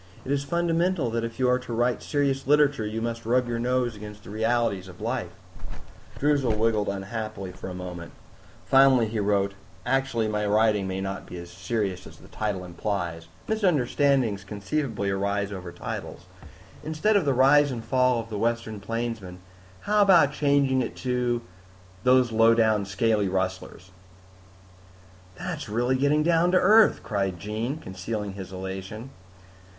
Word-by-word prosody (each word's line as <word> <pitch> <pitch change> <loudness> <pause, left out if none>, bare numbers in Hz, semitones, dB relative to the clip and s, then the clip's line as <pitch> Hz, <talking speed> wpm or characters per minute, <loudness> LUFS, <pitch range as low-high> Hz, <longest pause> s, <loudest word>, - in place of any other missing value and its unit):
It 135 - -3
is 140 0 +1
fundamental 170 -2 0
that 115 0 -1
if 115 0 -5
you 130 -1 +2
are 125 0 +3
to 125 -1 -7
write 120 +1 +1
serious 140 -2 -1
literature, 145 -6 +3
you 110 +1 -3
must 115 0 -3
rub 125 +2 +1
your 120 -1 -2
nose 125 -1 0
against 105 0 -10
the - - -10
realities 110 -3 0
of 90 -1 -13
life." - - -2 0.9
Droozle 140 -6 +1
wriggled 110 -2 +1
unhappily 100 0 -5
for 95 +1 -8
a 90 - -6
moment. 90 -2 -7 0.5
Finally 135 -4 +5
he 110 0 -2
wrote, 100 -1 +1 0.3
"Actually 135 -4 0
my 105 -1 -1
writing 105 -1 +2
may 95 0 -3
not 95 0 -5
be 90 - -8
as 85 0 -9
serious 95 0 -3
as - - -14
the - - -16
title 100 -4 -3
implies. 85 -2 -4 0.2
Misunderstandings 140 - +1
conceivably 105 +1 -2
arise 100 +1 -1
over 90 -3 -7
titles. 85 - -7 0.6
Instead 160 +8 +1
of 200 - +4
The 140 -3 +1
Rise 145 +3 +5
and 120 -4 -5
Fall 125 -2 +2
of 115 0 -7
the 105 - -3
Western 115 -2 -1
Plainsman, 115 -3 -4 0.4
how 210 0 +2
about 175 -8 +5
changing 140 -3 +2
it 120 - -4
to 125 -2 -1 0.6
Those 125 -1 +4
Lowdown 110 -2 +4
Scaly 105 +1 +1
Rustlers?" 95 0 -3 1.4
"That's - - -5
really 120 +4 +1
getting 145 +3 +2
down 170 +1 +3
to - - +6
earth," 215 +4 +5
cried 100 -5 -2
Jean, 110 - -3
concealing 100 - -5
his 95 -1 -8
elation. 95 +6 -6
115 Hz, 155 wpm, -26 LUFS, 100-135 Hz, 1.4 s, to